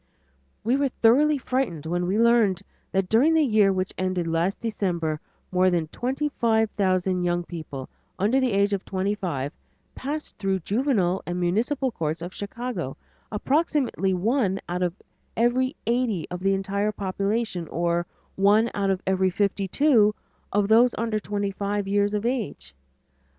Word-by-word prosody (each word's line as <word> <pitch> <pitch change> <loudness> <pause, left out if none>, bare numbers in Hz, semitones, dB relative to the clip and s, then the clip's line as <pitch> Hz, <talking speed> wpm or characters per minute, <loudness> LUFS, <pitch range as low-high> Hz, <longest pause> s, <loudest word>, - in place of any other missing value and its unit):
We 245 +5 +2
were 280 0 +2
thoroughly 280 +6 +4
frightened 250 - -2
when 175 +2 -1
we 195 +3 +1
learned 230 -5 +3 0.3
that 190 -1 +1
during 265 - +4
the 320 - +5
year 215 -6 +4
which 185 0 -2
ended 185 -2 0
last 165 +4 0
December, 175 -8 -2 0.3
more 185 0 +4
than 170 -3 0
twenty 270 - -2
five 225 -2 +2
thousand 185 -2 +1
young 175 0 0
people 155 -6 -7 0.3
under 215 +8 +2
the 260 -2 +1
age 200 +1 +2
of 195 - -1
twenty 195 +1 -1
five 160 -9 -3 0.4
passed 300 +3 -5
through 195 -1 +1
the - - -2
Juvenile 205 -6 +1
and 175 0 -2
Municipal 240 +10 0
Courts 160 -4 -3
of 175 +2 -6
Chicago 205 - -5 0.3
approximately 265 - +1
one 195 +1 +1
out 180 +1 -3
of 175 -1 0 0.4
every 250 +3 +2
eighty 235 -6 0
of 180 - -4
the 195 +1 +2
entire 200 +2 -1
population, 200 -2 -2
or 170 +1 -1 0.3
one 210 +4 +4
out 200 -1 0
of 190 -1 -1
every 190 0 +2
fifty 200 +1 0
two 220 -3 +4 0.4
of 205 0 +2
those 230 +3 +5
under 225 -1 0
twenty 205 -1 -2
five 200 0 -2
years 205 +1 +1
of 210 +2 -2
age. 225 - -3
200 Hz, 160 wpm, -25 LUFS, 180-235 Hz, 0.4 s, the